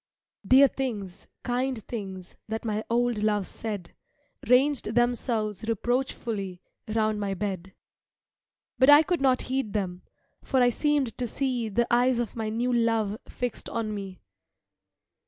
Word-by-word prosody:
Dear 260 Hz, +7 st, +7 dB
things, 215 Hz, -9 st, -5 dB, 0.2 s
kind 250 Hz, -2 st, -1 dB
things, 190 Hz, -5 st, -7 dB
That 220 Hz, +1 st, -4 dB
my 215 Hz, -1 st, -1 dB
old 240 Hz, -2 st, +1 dB
love 210 Hz, -2 st, +1 dB
said, 205 Hz, -6 st, -6 dB, 0.5 s
Ranged 250 Hz, -2 st, +3 dB
themselves 230 Hz, -4 st, 0 dB
reproachfully 230 Hz, -5 st, -2 dB, 0.3 s
Round 215 Hz, -1 st, 0 dB
my 200 Hz, -1 st, -2 dB
bed. 190 Hz, -1 st, -4 dB, 1.0 s
But 260 Hz, +2 st, +6 dB
I 290 Hz, +2 st, +9 dB
could 345 Hz, -1 st, -1 dB
not 260 Hz, -2 st, +3 dB
heed 260 Hz, -5 st, -2 dB
them, 185 Hz, -4 st, -2 dB, 0.4 s
For 265 Hz, -, +1 dB
I 245 Hz, -1 st, +5 dB
seemed 290 Hz, -3 st, 0 dB
to 245 Hz, -, -1 dB
see 245 Hz, -2 st, -1 dB
The 235 Hz, +4 st, +1 dB
eyes 245 Hz, +1 st, +4 dB
of 240 Hz, -2 st, -3 dB
my 220 Hz, -2 st, -2 dB
new 240 Hz, +3 st, 0 dB
love 225 Hz, -3 st, +1 dB
Fixed 245 Hz, -2 st, -4 dB
on 225 Hz, -2 st, -2 dB
me. 195 Hz, -3 st, -7 dB
230 Hz, 140 wpm, -27 LUFS, 210-250 Hz, 1.0 s, I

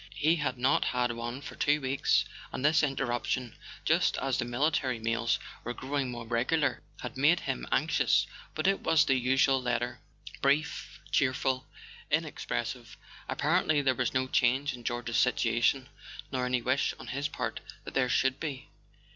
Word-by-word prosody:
He 160 Hz, +3 st, +3 dB
had 145 Hz, -4 st, -1 dB
not 130 Hz, +2 st, +2 dB
had 125 Hz, -1 st, +1 dB
one 120 Hz, +3 st, -5 dB
for -, -, -8 dB
two 145 Hz, +1 st, +2 dB
weeks, 135 Hz, 0 st, +2 dB, 0.3 s
and 135 Hz, -, -3 dB
this 155 Hz, +1 st, +5 dB
interruption, 125 Hz, -3 st, -1 dB, 0.3 s
just -, -, +3 dB
as 135 Hz, -2 st, -1 dB
the 120 Hz, -, 0 dB
military 130 Hz, 0 st, 0 dB
mails 115 Hz, +1 st, 0 dB, 0.3 s
were 120 Hz, +1 st, -4 dB
growing 135 Hz, -1 st, -2 dB
more 120 Hz, -1 st, -6 dB
regular, 130 Hz, +7 st, +1 dB, 0.2 s
had -, -, -6 dB
made 155 Hz, +6 st, +4 dB
him -, -, -3 dB
anx¬ -, -, +2 dB
ious. -, -, +4 dB, 0.3 s
But 155 Hz, -, -2 dB
it 195 Hz, 0 st, +3 dB
was 155 Hz, -2 st, +3 dB
the 135 Hz, -, +3 dB
usual 130 Hz, +1 st, +3 dB
letter: 125 Hz, -1 st, -1 dB, 0.4 s
brief, 140 Hz, +3 st, 0 dB
cheerful, 130 Hz, -1 st, +1 dB, 0.4 s
inex¬ -, -, -1 dB
pressive. -, -, -3 dB, 0.3 s
Apparently 150 Hz, -2 st, +2 dB
there 130 Hz, -1 st, +3 dB
was 125 Hz, -2 st, -1 dB
no 130 Hz, 0 st, 0 dB
change 130 Hz, +3 st, +2 dB
in 120 Hz, -1 st, -10 dB
George's 120 Hz, 0 st, -2 dB
situation, 125 Hz, +2 st, +2 dB, 0.4 s
nor 130 Hz, -2 st, -1 dB
any 125 Hz, -1 st, 0 dB
wish 130 Hz, +3 st, +1 dB
on -, -, -10 dB
his 140 Hz, +3 st, -1 dB
part 150 Hz, -, -4 dB, 0.2 s
that -, -, -8 dB
there 130 Hz, -2 st, +2 dB
should 130 Hz, +1 st, +2 dB
be. 140 Hz, -4 st, -5 dB
130 Hz, 165 wpm, -30 LUFS, 120-140 Hz, 0.4 s, this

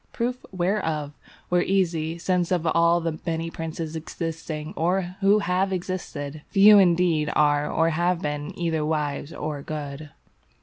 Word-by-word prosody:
Proof 250 Hz, +1 st, -2 dB
whereof 175 Hz, -6 st, -1 dB, 0.4 s
were 180 Hz, 0 st, +4 dB
easy, 170 Hz, -4 st, 0 dB
since 180 Hz, 0 st, 0 dB
of 175 Hz, -2 st, +1 dB
all 170 Hz, +1 st, +3 dB
the 160 Hz, -1 st, -3 dB
many 165 Hz, -1 st, -2 dB
princes 165 Hz, -1 st, -5 dB
existing, 160 Hz, 0 st, -5 dB
or 180 Hz, +2 st, 0 dB
who 200 Hz, +2 st, +5 dB
have 185 Hz, 0 st, 0 dB
existed, 165 Hz, -5 st, -4 dB
few 205 Hz, +1 st, +8 dB
indeed 170 Hz, -4 st, +3 dB
are 145 Hz, 0 st, +3 dB
or 165 Hz, 0 st, +2 dB
have 175 Hz, +2 st, +1 dB
been 150 Hz, -2 st, -3 dB
either 165 Hz, -3 st, -1 dB
wise 150 Hz, -1 st, -2 dB
or 150 Hz, -3 st, -4 dB
good. 145 Hz, 0 st, -6 dB
165 Hz, 140 wpm, -25 LUFS, 155-180 Hz, 0.4 s, few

